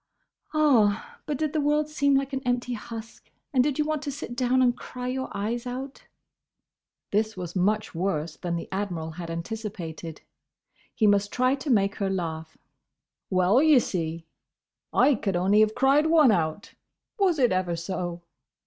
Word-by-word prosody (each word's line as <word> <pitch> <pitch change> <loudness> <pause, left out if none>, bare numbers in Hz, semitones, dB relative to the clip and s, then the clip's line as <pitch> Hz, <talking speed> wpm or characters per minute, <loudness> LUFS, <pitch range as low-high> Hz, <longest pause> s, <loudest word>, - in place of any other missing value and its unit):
"Ah! 240 -10 +2
but 295 - -1
did 310 0 -1
the 310 - +1
world 295 +1 +2
seem 285 -2 +2
like 275 0 0
an 270 - -1
empty 245 0 -1
husk? 225 0 -9 0.2
and 255 -2 +4
did 285 -1 0
you 300 - +1
want 305 -1 -1
to 295 -2 -4
sit 270 -3 -7
down 255 +1 +2
and 245 -1 +3
cry 250 0 -7
your 260 +1 -3
eyes 235 +5 -3
out?" 260 +3 -7 1.0
This 215 0 0
was 175 -1 -6
much 210 +4 +1
worse 165 -3 -2
than 175 -1 -3
the 170 - -5
Admiral 180 -5 -3
had 170 +1 -7
anticipated. 170 -3 -6 0.7
He 220 - +2
must 205 0 +3
try 255 +1 +2
to 280 +2 -4
make 200 -4 +2
her 195 -2 -1
laugh. 160 -4 -4 0.7
"Well, 185 +6 +4
ye 310 -2 +6
see, 165 -7 -2 0.7
I 290 - +4
could 205 -5 -2
only 190 +4 +3
have 215 0 +3
cried 280 +3 +4
one 315 -6 +6
out, 165 0 -1 0.5
was 370 -5 +3
it 250 -4 +3
ever 185 -2 0
so!" 175 0 -4
220 Hz, 165 wpm, -26 LUFS, 180-270 Hz, 1.0 s, ye